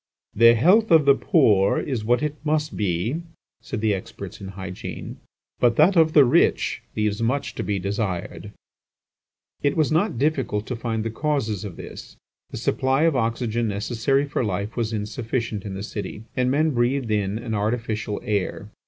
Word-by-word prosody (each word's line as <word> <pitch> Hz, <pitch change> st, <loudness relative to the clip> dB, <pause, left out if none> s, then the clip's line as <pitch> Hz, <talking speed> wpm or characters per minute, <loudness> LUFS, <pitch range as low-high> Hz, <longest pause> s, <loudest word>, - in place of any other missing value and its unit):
"The 115 Hz, +2 st, +6 dB
health 190 Hz, -, +4 dB
of 160 Hz, -3 st, +6 dB
the 140 Hz, -, +7 dB
poor 110 Hz, -, +3 dB
is 125 Hz, -7 st, -3 dB
what 120 Hz, +5 st, +2 dB
it 150 Hz, -1 st, -1 dB
must 150 Hz, 0 st, 0 dB
be," 105 Hz, -, -1 dB, 0.4 s
said 115 Hz, -8 st, -5 dB
the 110 Hz, -2 st, +2 dB
experts 95 Hz, +1 st, -7 dB
in 95 Hz, -, -6 dB
hygiene, 95 Hz, -1 st, -7 dB, 0.4 s
"but 120 Hz, -2 st, +3 dB
that 170 Hz, +8 st, +5 dB
of 160 Hz, -2 st, +4 dB
the 145 Hz, -3 st, +7 dB
rich 120 Hz, -, +2 dB
leaves 105 Hz, 0 st, -1 dB
much 140 Hz, +5 st, -1 dB
to -, -, -4 dB
be 105 Hz, -1 st, -1 dB
desired." 100 Hz, -2 st, -3 dB, 1.1 s
It 145 Hz, +1 st, +1 dB
was 155 Hz, -1 st, +2 dB
not 165 Hz, -, +1 dB
difficult 130 Hz, -7 st, 0 dB
to 125 Hz, -, -4 dB
find 115 Hz, -1 st, -3 dB
the 115 Hz, -, -2 dB
causes 115 Hz, -, -1 dB
of 100 Hz, -5 st, -7 dB
this. -, -, -10 dB, 0.3 s
The -, -, -7 dB
supply 130 Hz, +3 st, +1 dB
of 165 Hz, -3 st, +3 dB
oxygen 115 Hz, -1 st, 0 dB
necessary 115 Hz, +7 st, 0 dB
for 140 Hz, -2 st, -2 dB
life 100 Hz, 0 st, -3 dB
was 115 Hz, -2 st, -1 dB
insufficient 110 Hz, 0 st, -3 dB
in 100 Hz, -2 st, -5 dB
the 95 Hz, -, -5 dB
city, 105 Hz, 0 st, -6 dB
and 125 Hz, -1 st, +1 dB
men 155 Hz, +4 st, +2 dB
breathed 120 Hz, -1 st, 0 dB
in 105 Hz, -1 st, 0 dB
an 115 Hz, -1 st, -5 dB
artificial 110 Hz, 0 st, -2 dB
air. 100 Hz, -3 st, -2 dB
115 Hz, 170 wpm, -23 LUFS, 105-140 Hz, 1.1 s, the